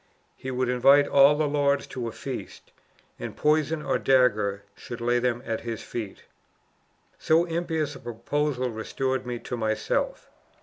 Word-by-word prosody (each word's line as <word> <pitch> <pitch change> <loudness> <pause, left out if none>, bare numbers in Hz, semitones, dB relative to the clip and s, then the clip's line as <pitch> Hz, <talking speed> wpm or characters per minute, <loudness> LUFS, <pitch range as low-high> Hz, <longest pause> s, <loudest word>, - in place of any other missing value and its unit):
He 130 - -7
would 130 0 -1
invite 135 +3 +5
all 140 +1 +6
the 150 0 +1
lords 145 -1 +1
to 120 -2 -5
a - - -4
feast; - - -7 0.5
and - - -6
poison, 155 +1 +1
or - - 0
dagger, 105 -7 +2
should 120 - -8
lay 120 +1 +1
them 120 0 -1
at 115 -1 -2
his 115 -1 -5
feet. 110 -5 -6 1.0
"So 165 +2 +3
impious 165 -3 -2
a - - -10
proposal 125 +2 -2
restored 130 +4 -2
me 120 -1 -3
to 125 - -5
myself. 110 -2 -2
130 Hz, 150 wpm, -26 LUFS, 120-145 Hz, 1.0 s, all